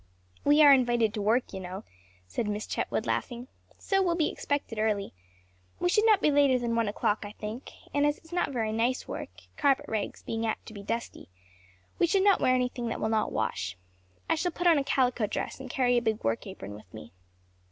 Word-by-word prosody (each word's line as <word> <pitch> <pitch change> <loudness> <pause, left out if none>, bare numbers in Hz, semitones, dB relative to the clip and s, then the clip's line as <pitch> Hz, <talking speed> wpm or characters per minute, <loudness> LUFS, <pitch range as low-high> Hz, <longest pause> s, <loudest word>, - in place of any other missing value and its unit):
"We 295 +2 +6
are 285 -1 +9
invited 240 -4 +2
to 215 - -3
work, 225 +4 +1
you 190 - -4
know," 185 +2 -7 0.4
said 90 - -3
Miss 210 +1 -2
Chetwood, - - -2
laughing, 240 0 -3 0.3
"so 390 -1 +1
will 350 -3 +1
be 320 -3 +1
expected 285 -6 -3
early; 210 -2 0 0.7
we 355 - +1
should 425 +4 +3
not 430 -2 +4
be 300 - +4
later 280 -3 +4
than 235 -1 -1
one 230 -2 +1
o'clock, 210 +1 0
I 205 0 -8
think, 220 +4 -7 0.2
and 285 - +2
as 295 0 +2
it - - -24
is 320 - -13
not 355 - +1
very 225 -4 -1
nice 235 +4 0
work - - -5 0.3
carpet 275 -2 +2
rags 215 -2 -3
being 225 0 -3
apt 225 - -2
to 220 - -10
be 200 - -8
dusty 230 - -5 0.7
we 345 - +4
should 385 +2 +2
not 400 -1 +4
wear 255 - +4
anything 250 -1 -1
that 230 - -3
will 220 - -1
not 220 -1 +1
wash. 95 -4 -2 0.5
I - - +3
shall 350 +2 -1
put 350 +2 -5
on 335 -4 +6
a - - -1
calico 250 -5 +1
dress 215 - -4
and 265 -1 -8
carry 245 -1 +2
a - - -10
big 220 -2 -1
work 115 - -1
apron 105 - -8
with 105 -3 -13
me." 75 +1 -11
240 Hz, 220 wpm, -28 LUFS, 215-285 Hz, 0.7 s, are